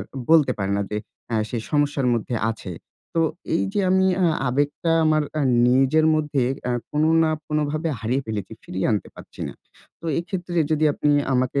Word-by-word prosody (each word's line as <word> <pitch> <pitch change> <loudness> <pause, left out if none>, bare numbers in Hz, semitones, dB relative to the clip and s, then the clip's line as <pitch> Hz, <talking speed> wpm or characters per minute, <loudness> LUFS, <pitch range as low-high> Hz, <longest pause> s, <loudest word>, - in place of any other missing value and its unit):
আর 95 - -5 0.3
বলতে 150 -6 +5
পারে 100 0 -1
না। 100 - 0
যে 105 - -2 0.3
অ্যা 115 - -1
সে 120 - -4
সমস্যার 145 -3 +1
মধ্যে 120 +1 -2 0.2
আছে। 100 -5 -7 0.4
তো 165 - +2 0.3
এই - - +2
যে 205 - +1
আমি 190 0 +4 0.2
আ - - +4 0.2
আবেগটা 145 +5 0
আমার 155 -1 +3 0.2
আ - - +1 0.3
নিজের 135 +5 +4
মধ্যে 150 -3 0 0.3
আ - - 0 0.2
কোনো 155 +1 +2
না 160 - +2 0.2
কোনোভাবে 150 +1 -1
হারিয়ে 125 +5 -1
ফেলেছি, 105 -2 -4
ফিরিয়ে 95 +1 -3
আনতে 105 - -2
পাচ্ছি - - -13
না। - - -7 0.5
তো 165 - -16
এইক্ষেত্রে 175 0 -3
যদি 155 0 +2
আপনি 145 +1 +1 0.2
আমাকে 130 +2 +1
145 Hz, 180 wpm, -23 LUFS, 125-155 Hz, 0.5 s, বলতে